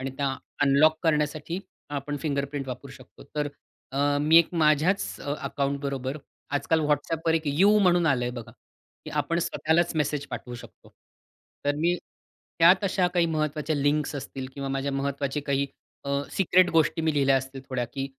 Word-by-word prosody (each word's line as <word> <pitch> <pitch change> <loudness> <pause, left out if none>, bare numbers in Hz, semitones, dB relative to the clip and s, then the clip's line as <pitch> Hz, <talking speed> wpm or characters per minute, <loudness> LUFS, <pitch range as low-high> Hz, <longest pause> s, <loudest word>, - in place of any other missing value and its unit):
आणि 135 +1 -3
त्या 135 -1 0 0.3
अनलॉक 150 +3 +4
करण्यासाठी 155 +1 0 0.3
आपण 145 0 -3
फिंगरप्रिंट 140 -1 -2
वापरू 130 +2 -7
शकतो. - - -15
तर 150 -1 0 0.4
अ, 145 +1 +2
मी 155 +2 +5
एक 170 - +3
माझ्याच 160 +4 +2 0.2
अकाउंटबरोबर 140 -1 -2 0.3
आजकाल 150 +3 +1
WhatsAppवर 155 +2 0
एक 160 - +1
यू 195 +9 +4
म्हणून 175 -3 +3
आलं 130 -5 +2
आहे 120 - -1
बघा, 120 -2 -8 0.5
की - - -7
आपण 150 +3 0
स्वतःलाच 170 0 +1
मेसेज 145 -1 -1
पाठवू 125 - -6
शकतो. 120 - -13 0.8
तर 145 0 +2
मी 170 +3 +2 0.6
त्यात 180 +4 +6
अशा 185 -2 +2
काही 175 -1 +3
महत्वाच्या 155 -1 -1
लिंक्स 145 +1 +1
असतील 135 -1 -6
किंवा 140 -1 -4
माझ्या 135 +1 -2
महत्वाचे 140 +1 -2
काही 140 -1 0 0.4
अ, 140 0 0
सिक्रेट 185 -1 +4
गोष्टी 160 0 +2
मी 160 -1 +2
लिहिल्या 135 -2 +4
असतील 135 +1 -4
थोड्या, 125 -2 -1
की 135 +3 -5
145 Hz, 160 wpm, -26 LUFS, 140-160 Hz, 0.8 s, त्यात